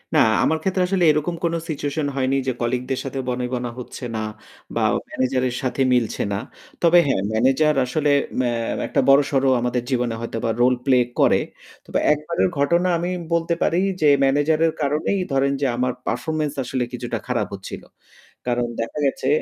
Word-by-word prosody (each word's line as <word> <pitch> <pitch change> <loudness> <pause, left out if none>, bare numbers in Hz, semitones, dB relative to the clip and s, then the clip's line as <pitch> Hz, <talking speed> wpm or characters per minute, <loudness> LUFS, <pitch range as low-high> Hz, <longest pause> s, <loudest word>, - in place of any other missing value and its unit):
না, - - +6 0.2
আমার 160 - +2
ক্ষেত্রে 190 -1 +1
আসলে 185 -1 +1
এরকম 150 +3 -1
কোন 170 0 +1 0.2
সিচুয়েশন 145 0 -2
হয়নি 130 0 +1
যে - - +2
কলিগদের 125 +2 -1
সাথে 135 0 -4
বনিবনা 125 0 -2
হচ্ছে 125 - -9
না - - -1 0.6
বা - - 0 0.3
ম্যানেজারের 130 -1 0
সাথে 130 +1 -1
মিলছে 120 -3 0
না। 100 - 0 0.5
তবে 170 +1 +6
হ্যাঁ, 135 -8 +1
ম্যানেজার 135 +7 +3
আসলে 150 +4 0 0.3
ম্যা 125 -1 +1 0.4
একটা - - +1
বড়সড় 135 -1 +4 0.2
আমাদের 125 0 -1
জীবনে 125 -3 0
হয়তোবা 115 -1 -3
রোল-প্লে 125 +1 +3 0.2
করে। - - +5 0.5
তবে - - -1
একবারের 155 +4 -1
ঘটনা 170 +6 +2
আমি 175 +2 -2 0.2
বলতে 170 0 +1
পারি 170 - +2 0.2
যে 155 - +4 0.2
ম্যানেজারের 155 +4 +3
কারণেই 150 +7 0
ধরেন 135 0 +2
যে - - +2
আমার 125 +1 0 0.2
পারফরম্যান্স 150 +4 -1
আসলে 125 0 -2
কিছুটা 120 -1 -3
খারাপ - - 0
হচ্ছিল। - - -7 0.7
কারণ 120 -1 0
দেখা 115 +6 -4
গেছে 135 -1 -1
135 Hz, 160 wpm, -22 LUFS, 125-155 Hz, 0.7 s, না